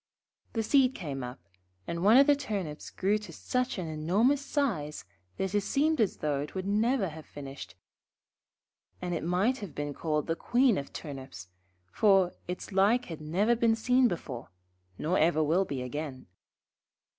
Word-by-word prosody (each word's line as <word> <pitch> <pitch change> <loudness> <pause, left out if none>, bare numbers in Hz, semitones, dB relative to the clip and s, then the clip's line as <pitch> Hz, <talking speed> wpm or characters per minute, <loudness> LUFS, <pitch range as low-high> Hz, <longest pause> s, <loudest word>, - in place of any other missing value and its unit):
The 225 - 0
seed 265 +2 +4
came 140 -7 -5
up, 125 -3 -8 0.4
and 170 +1 -3
one 215 +5 +7
of 275 - +8
the 290 0 +5
Turnips 200 - -4
grew 205 +3 +1
to 210 - -10
such 250 -1 -2
an 180 - -3
enormous 195 - +2
size, 200 - -2 0.3
that 190 0 -2
it 205 - +3
seemed 300 +6 +1
as 210 - +1
though 145 -2 -1
it 150 - -7
would 190 0 -3
never 215 +1 +1
have 155 0 -11
finished; 135 - -9 1.2
and 180 -1 -3
it 165 - -2
might 190 +10 +1
have 200 -7 -8
been 145 0 -3
called 150 0 -1
the 165 - -1
Queen 245 - +3
of 140 - -8
Turnips, 130 - -8 0.4
for 195 - +4
its 180 +3 -5
like 205 +6 +3
had 155 - -9
never 195 +10 +2
been 230 -1 +3
seen 250 +3 +3
before, 135 - -5 0.5
nor 175 +5 0
ever 155 0 +3
will 170 +6 +2
be 135 -6 -4
again. 140 0 -5
185 Hz, 170 wpm, -29 LUFS, 150-225 Hz, 1.2 s, of